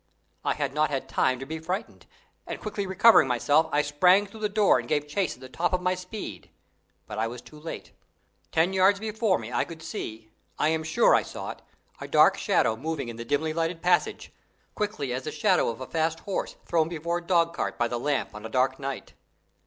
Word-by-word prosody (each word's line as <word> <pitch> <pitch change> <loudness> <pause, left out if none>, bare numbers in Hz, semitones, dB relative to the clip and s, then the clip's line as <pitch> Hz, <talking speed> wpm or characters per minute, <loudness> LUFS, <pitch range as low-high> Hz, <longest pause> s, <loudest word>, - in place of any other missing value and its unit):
I - - 0
had 140 -2 -2
not 155 +1 +2
had 135 -2 -3
time 130 -1 +1
to 135 - -7
be 160 +3 -5
frightened, 185 +7 -5 0.4
and - - -5
quickly 205 -2 -4
recovering 190 -3 +6
myself, 145 +6 +3
I 150 0 +2
sprang 180 +7 +4
through 205 +2 -12
the 210 -1 -1
door 205 -1 +4
and - - -7
gave 150 -1 0
chase 175 +3 -1
at 125 - -21
the 130 - -9
top 170 +8 -1
of 180 - +1
my 180 0 +2
speed, 185 - -7 0.6
but 105 - -6
I 110 - +1
was 120 +2 -7
too 150 +5 -14
late. 160 +2 -7 0.6
Ten 165 +4 +2
yards 190 +1 +4
before 220 -2 +1
me 115 +2 -8
I 120 - +2
could 160 -1 -10
see 110 - -6 0.3
I 150 - +2
am 160 0 0
sure 160 0 +3
I - - +5
saw - - -6
it - - -12 0.4
a - - -6
dark - - +5
shadow 110 - +2
moving 145 0 -4
in 115 - -7
the 115 - -5
dimly 150 +5 0
lighted 165 +1 -2
passage, 180 0 +1 0.4
quickly 205 -12 -2
as 130 +1 -4
the - - -3
shadow 150 - +2
of 115 +2 -6
a - - -4
fast 160 +2 -1
horse 200 - -3
thrown 165 -2 +1
before 170 +1 -2
a - - -14
dogcart 170 -2 +1
by 120 - +1
the 120 0 -3
lamp 140 +1 -1
on 105 0 -9
a 110 - -6
dark 130 +3 +1
night. 135 -1 -5
160 Hz, 220 wpm, -27 LUFS, 130-180 Hz, 0.6 s, recovering